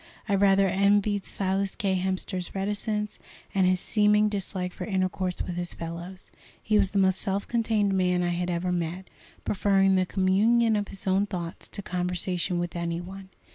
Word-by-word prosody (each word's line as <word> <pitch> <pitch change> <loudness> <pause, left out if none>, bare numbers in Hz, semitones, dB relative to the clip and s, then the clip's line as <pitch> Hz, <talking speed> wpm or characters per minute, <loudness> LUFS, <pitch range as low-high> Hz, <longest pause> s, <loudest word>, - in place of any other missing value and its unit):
I 200 - 0
rather 195 0 +4
envied 200 +1 +2
Silas 195 0 -1
K. 195 -2 0
Hemster's 185 0 -2
reticence, 210 +2 -2 0.3
and 190 -2 +3
his 185 0 +2
seeming 210 +1 +3
dislike 190 -3 -3
for - - -6
intercourse 185 -2 -1
with 175 -1 -5
his 175 0 -3
fellows. 170 +3 -7 0.3
He 215 -1 +2
was 195 -2 +3
the 200 - -3
most 190 -1 +3
self 200 -1 -1
contained 220 -4 +1
man 180 -1 +2
I 175 - +1
had 175 +1 -1
ever 175 +1 -1
met, 175 +1 -3 0.3
preferring 195 -1 +3
the 185 -1 +2
communion 215 +5 +3
of 205 -1 -1
his 195 - -10
own 195 +2 +2
thoughts 175 -4 -5
to 200 - -6
conversation 180 0 -1
with 175 0 -3
any 170 0 -2
one. 190 +2 -9
190 Hz, 175 wpm, -27 LUFS, 180-200 Hz, 0.3 s, rather